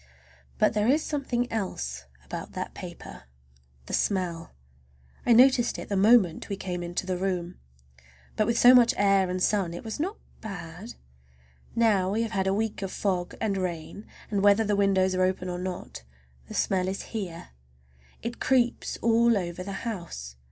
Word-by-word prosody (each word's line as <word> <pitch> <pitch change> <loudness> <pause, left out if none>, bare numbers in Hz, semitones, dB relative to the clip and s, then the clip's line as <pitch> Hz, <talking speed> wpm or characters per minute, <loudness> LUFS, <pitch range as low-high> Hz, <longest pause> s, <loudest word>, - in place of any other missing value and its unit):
But - - +3
there 210 +1 +1
is 295 +5 +3
something 265 -5 -1
else 65 - -3 0.2
about - - -7
that - - -5
paper—the 65 0 -12
smell! 180 -4 -1 0.8
I - - +4
noticed 245 0 +5
it - - -8
the 200 - 0
moment 195 -4 +4
we 200 - -1
came 180 -2 -4
into 175 +1 -3
the 185 -1 -2
room, 180 -2 -2 0.8
but 215 - +1
with 235 - +1
so 245 +2 +8
much 245 -2 +6
air 195 -2 +3
and 180 0 -1
sun 190 -5 +1
it - - -7
was 220 +3 -5
not 375 +8 -2 0.2
bad. 195 0 -8 0.8
Now 210 -5 +3
we 220 +4 0
have 225 - -4
had 195 -3 0
a - - +3
week 215 +1 -1
of 195 -1 -3
fog 180 -3 -2
and 205 -3 0
rain, 180 +2 -5 0.2
and 200 -2 +1
whether 205 +2 +5
the 210 -1 +1
windows 195 -2 +2
are 185 - 0
open 185 0 0
or 180 0 -4
not, 180 - -6 0.5
the - - -8
smell 185 -1 +1
is 190 +1 -3
here. 180 -6 -5 0.7
It 235 +1 -5
creeps 245 -2 +1
all 230 0 +4
over 175 -1 -4
the 195 +4 -6
house. 170 - -6
195 Hz, 170 wpm, -27 LUFS, 180-225 Hz, 0.8 s, so